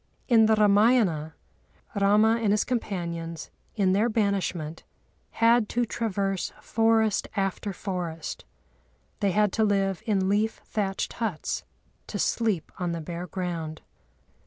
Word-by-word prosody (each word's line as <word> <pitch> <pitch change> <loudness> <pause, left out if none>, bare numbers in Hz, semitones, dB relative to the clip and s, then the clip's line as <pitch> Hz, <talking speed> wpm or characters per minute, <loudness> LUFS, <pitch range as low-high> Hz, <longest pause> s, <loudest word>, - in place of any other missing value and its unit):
In 225 -3 +6
the 220 - +4
Râmâyana, 205 -7 +3 0.6
Râma 210 +3 +4
and 205 - +3
his 210 +1 +3
companions, 170 -8 -4 0.2
in 190 -4 +2
their 215 +5 +2
banishment, 190 -7 -1 0.5
had 230 -1 +4
to 240 0 +1
traverse 195 -5 -2
forest 225 -2 +2
after 195 +1 -1
forest; 175 -4 -5 0.8
they 200 - +2
had 210 +1 +2
to 220 - +2
live 195 -3 +1
in 195 -3 +2
leaf 210 +3 +1
thatched 195 -3 -2
huts, 215 -9 -3 0.4
to - - -4
sleep 215 -9 0
on 175 -2 -1
the 170 - -3
bare 175 +2 -6
ground. 170 -4 -4
200 Hz, 125 wpm, -26 LUFS, 180-220 Hz, 0.8 s, In